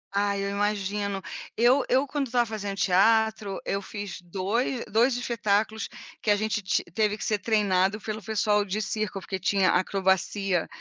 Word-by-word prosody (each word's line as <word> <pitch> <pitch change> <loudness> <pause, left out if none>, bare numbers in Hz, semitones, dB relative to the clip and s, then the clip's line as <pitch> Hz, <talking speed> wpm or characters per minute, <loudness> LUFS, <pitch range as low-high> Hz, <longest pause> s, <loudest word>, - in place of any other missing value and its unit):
Ai, 200 0 +1
eu 200 - -1
imagino. 200 -1 -1 0.3
Eu 250 +4 +4
eu, 265 +3 +3
quando 280 0 -2
estava 240 0 +2
fazendo 205 -3 -5
teatro, 210 +1 +2
eu 200 - -1
fiz 200 -2 -7
2- 205 +8 -2
2 235 +4 +2
espetáculos 220 -2 0 0.3
que - - -2
a 205 - +6
gente 210 0 -1
ti 190 - 0
teve 210 +1 +1
que - - -6
ser 210 -1 +1
treinado 200 -1 +2
pelo 215 0 -5
pessoal 210 0 +1
de 200 +1 -3
circo, 215 -1 -2
porque 190 0 -5
tinha 190 0 +2
acrobacia. 190 0 +1
205 Hz, 160 wpm, -26 LUFS, 195-220 Hz, 0.3 s, a